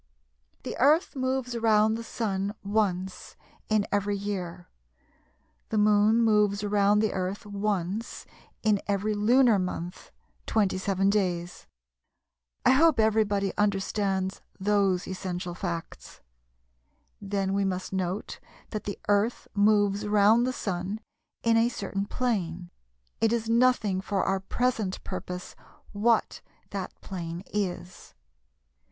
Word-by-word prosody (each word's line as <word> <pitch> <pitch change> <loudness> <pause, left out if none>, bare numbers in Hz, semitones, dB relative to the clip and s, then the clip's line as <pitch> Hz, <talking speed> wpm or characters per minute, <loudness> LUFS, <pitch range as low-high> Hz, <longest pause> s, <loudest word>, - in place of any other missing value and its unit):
The - - -5
Earth 300 +5 +4
moves 260 -2 -1
round 220 -1 +3
the 230 - -5
Sun 205 -3 -2
once 190 -3 -1 0.3
in 215 -2 +2
every 205 0 0
year; 185 -3 -5 1.0
the 220 - -1
Moon 210 +2 +4
moves 210 -2 +3
round 205 0 +3
the 215 - +1
Earth 190 +2 -3
once 205 0 -3 0.4
in 210 -3 +3
every 205 +1 0
lunar 230 +1 +4
month 180 -1 -5 0.4
(27 195 -1 +1
days). 180 -4 -2 1.0
I - - +7
hope 305 0 +5
everybody 210 -3 +2
understands 195 -1 0 0.2
those 195 -2 +1
essential 180 -1 -4
facts. 170 -2 -6 1.0
Then 195 -1 -1
we 200 0 +1
must 185 0 -3
note 190 +1 -3 0.3
that 215 - -4
the 200 - -4
Earth 205 +3 +1
moves 205 0 +3
round 210 +4 +4
the - - +1
Sun 195 -2 -3 0.4
in 230 0 +4
a 230 +1 +4
certain 200 -3 -4
plane 180 -9 -2 0.5
(it 225 - +3
is 230 -1 -1
nothing 230 -5 +3
for 195 0 -1
our 195 0 +1
present 215 -1 -1
purpose 180 -1 -6 0.4
what 220 +2 +1 0.3
that 195 -2 -5
plane 170 -2 -6
is). 185 - -4
205 Hz, 115 wpm, -27 LUFS, 190-220 Hz, 1.0 s, I